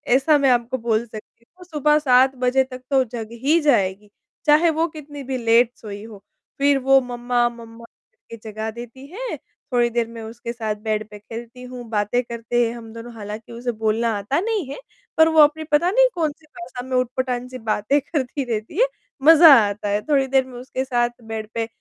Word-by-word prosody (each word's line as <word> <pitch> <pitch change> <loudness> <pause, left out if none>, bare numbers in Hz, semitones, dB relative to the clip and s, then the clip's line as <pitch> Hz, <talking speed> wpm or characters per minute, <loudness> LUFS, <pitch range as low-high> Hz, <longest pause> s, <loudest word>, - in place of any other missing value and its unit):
ऐसा 295 +3 +4
मैं 275 -2 +3
आपको 245 +1 0
बोल 230 -1 0
सकती 220 +1 -13
हूँ, 365 - -13
सुबह 300 -3 +2
7 260 -1 +4
बजे 255 +1 +2
तक 255 -1 -10
तो 265 -1 +4
जग 230 -2 -7 0.2
ही 310 +5 +4
जाएगी, 205 -8 +1 0.4
चाहे 310 +3 +5
वो 320 +1 +1
कितनी 295 -3 -10
भी 260 0 -3
लेट 230 0 +3
सोई 205 -1 -8
हो, 215 -3 -12 0.4
फिर 280 0 +4
वो 270 +1 +5
मम्मा, 245 -1 0
मम्मा 230 -1 -13 0.3
करके 355 - -13
जगा 220 +1 -4
देती 240 +3 -10
हैं, 465 +10 -5 0.4
थोड़ी 240 -1 +3
देर 235 -1 -1
मैं 230 0 -9
उसके 235 +1 -7
साथ 220 -3 -3
बेड 215 -1 -2
पे 210 - -11
खेलती 235 +4 -10
हूँ, 250 -1 -8
बातें 210 +3 0
करते 235 0 -1
हैं 230 - -4
हम 225 -2 -10
दोनों, 230 +1 -9
हालाँकि 215 +1 -8
उसे 240 +1 -3
बोलना 220 +1 0
आता 210 +10 -1
नहीं 420 -2 -1
है, - - -6 0.4
पर 320 0 +7
वो 320 -1 +3
अपनी 305 +2 +4
पता 315 +4 +3
नहीं - - +5
कौन-सी 310 -2 -3
भाषा 305 -6 -9
में 260 - -2
ऊँटपटाँग 250 0 -2
सी 255 - -7
बातें 220 +4 0
करती 280 -1 -3
रहती 220 - -3
है, - - +5 0.4
मज़ा 320 0 +9 0.2
आता 205 0 -4
है, 205 +1 0
थोड़ी 275 +1 +1
देर 265 -1 +2
मैं 250 -2 -10
उसके 260 +1 -4
साथ 240 -2 +1
बेड 220 -1 -5
पे 225 -1 -2
245 Hz, 200 wpm, -22 LUFS, 225-280 Hz, 0.4 s, मज़ा